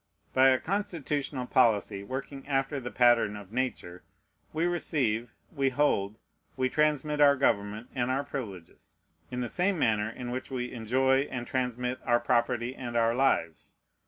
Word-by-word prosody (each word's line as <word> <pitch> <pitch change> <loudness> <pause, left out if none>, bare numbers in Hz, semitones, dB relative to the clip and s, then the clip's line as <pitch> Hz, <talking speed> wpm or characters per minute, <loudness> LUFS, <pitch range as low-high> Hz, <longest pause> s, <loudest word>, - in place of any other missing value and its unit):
By 130 0 +6
a 130 - +4
constitutional 155 -9 -2
policy 110 -6 +2
working 135 +4 -6
after 135 0 0
the 120 -2 -5
pattern 120 -4 +3
of 100 -1 -10
Nature, 115 -8 -3 0.5
we 160 +2 0
receive, 125 -10 -1 0.2
we 140 -4 +1
hold, 110 -7 +1 0.4
we 130 0 +1
transmit 150 0 +1
our 140 -1 +7
government 105 -3 0
and 125 -1 -1
our 135 +2 0
privileges, 100 -12 -8 0.3
in 125 0 -4
the 120 - -2
same 185 +7 0
manner 110 -6 +1
in 120 +2 -6
which 130 +1 -4
we 125 -2 -3
enjoy 130 +4 +1
and 125 -2 -4
transmit 125 0 -2
our 120 0 +3
property 120 0 0
and 120 -3 -4
our 115 0 +3
lives. 120 - 0
125 Hz, 155 wpm, -29 LUFS, 115-135 Hz, 0.5 s, our